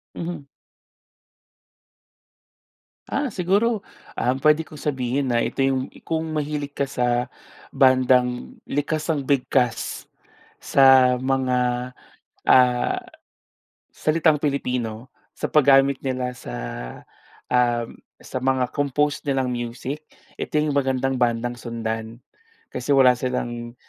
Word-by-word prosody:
Mhm. 170 Hz, -4 st, -5 dB, 2.6 s
Ah, 280 Hz, -1 st, -2 dB
siguro, 200 Hz, +4 st, +1 dB, 0.3 s
um, 125 Hz, +1 st, +1 dB
pwede 155 Hz, +1 st, +4 dB
ko 145 Hz, -, -14 dB
sabihin 135 Hz, -2 st, -2 dB
na 120 Hz, -1 st, +2 dB
ito -, -, -2 dB
yung 135 Hz, -1 st, +1 dB, 0.2 s
kung 160 Hz, 0 st, -2 dB
mahilig 145 Hz, -1 st, -3 dB
ka 140 Hz, -, 0 dB
sa 125 Hz, -1 st, 0 dB, 0.4 s
bandang 125 Hz, -2 st, +2 dB
likas 150 Hz, +2 st, -2 dB
ang 145 Hz, -3 st, -2 dB
bigkas 125 Hz, -3 st, 0 dB, 0.5 s
sa 130 Hz, -2 st, +6 dB
mga, 125 Hz, -1 st, 0 dB, 0.6 s
ah, 125 Hz, -1 st, +4 dB, 0.9 s
salitang 155 Hz, 0 st, +2 dB
Pilipino, 125 Hz, -5 st, -2 dB, 0.3 s
sa -, -, -3 dB
paggamit 140 Hz, -2 st, +4 dB
nila 130 Hz, -1 st, -2 dB
sa, -, -, -8 dB, 1.0 s
um, 120 Hz, -2 st, +1 dB, 0.2 s
sa -, -, -5 dB
mga 130 Hz, -1 st, +1 dB
compose 145 Hz, +1 st, 0 dB
nilang 135 Hz, -2 st, 0 dB
music, 125 Hz, +5 st, -5 dB, 0.4 s
ito -, -, -3 dB
yung 150 Hz, 0 st, +1 dB
magandang 135 Hz, -1 st, +1 dB
bandang 120 Hz, 0 st, 0 dB
sundan. 115 Hz, -1 st, -5 dB, 0.5 s
Kasi 130 Hz, +3 st, -1 dB
wala 130 Hz, -2 st, +7 dB
silang, 120 Hz, -2 st, -3 dB
130 Hz, 105 wpm, -23 LUFS, 125-145 Hz, 2.6 s, wala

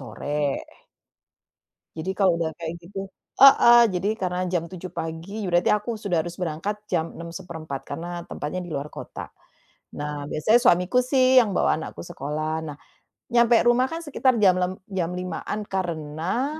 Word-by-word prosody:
sore. 140 Hz, +4 st, -2 dB, 1.4 s
Jadi 160 Hz, +4 st, -3 dB
kalau 185 Hz, -3 st, +3 dB
udah 160 Hz, -1 st, -2 dB
kayak 165 Hz, -1 st, -5 dB
gitu 195 Hz, +2 st, -7 dB, 0.3 s
heeh. 240 Hz, -3 st, +9 dB
Jadi 185 Hz, +2 st, -1 dB
karena 185 Hz, -3 st, -2 dB
jam 175 Hz, -2 st, -1 dB
7.00 185 Hz, 0 st, -8 dB
pagi, 170 Hz, +6 st, -5 dB
berarti 175 Hz, 0 st, +3 dB
aku 210 Hz, +2 st, -2 dB
sudah 180 Hz, -6 st, 0 dB
harus 175 Hz, +1 st, -7 dB
berangkat 180 Hz, +4 st, -3 dB
jam 160 Hz, -5 st, -2 dB
6.15 165 Hz, -4 st, -7 dB
karena 175 Hz, +1 st, -5 dB
tempatnya 150 Hz, +5 st, -4 dB
di 175 Hz, -, -9 dB
luar 145 Hz, 0 st, -4 dB
kota. -, -, -8 dB, 0.7 s
Nah, 145 Hz, 0 st, -4 dB
biasanya 215 Hz, +10 st, +3 dB
suamiku 185 Hz, -2 st, +3 dB
sih 255 Hz, 0 st, +5 dB
yang 225 Hz, -4 st, +1 dB
bawa -, -, +3 dB
anakku 160 Hz, -, -7 dB
sekolah. 155 Hz, -1 st, -4 dB
Nah, 150 Hz, -3 st, -7 dB, 0.6 s
nyampe 235 Hz, 0 st, +5 dB
rumah 240 Hz, +2 st, +4 dB
kan 330 Hz, +1 st, -5 dB
sekitar 265 Hz, -3 st, +2 dB
jam 185 Hz, -2 st, +5 dB
lem 180 Hz, 0 st, 0 dB, 0.2 s
jam 185 Hz, -3 st, -1 dB
5.00-an 185 Hz, +3 st, -4 dB
karena, 185 Hz, -, -2 dB
180 Hz, 150 wpm, -24 LUFS, 160-210 Hz, 1.4 s, heeh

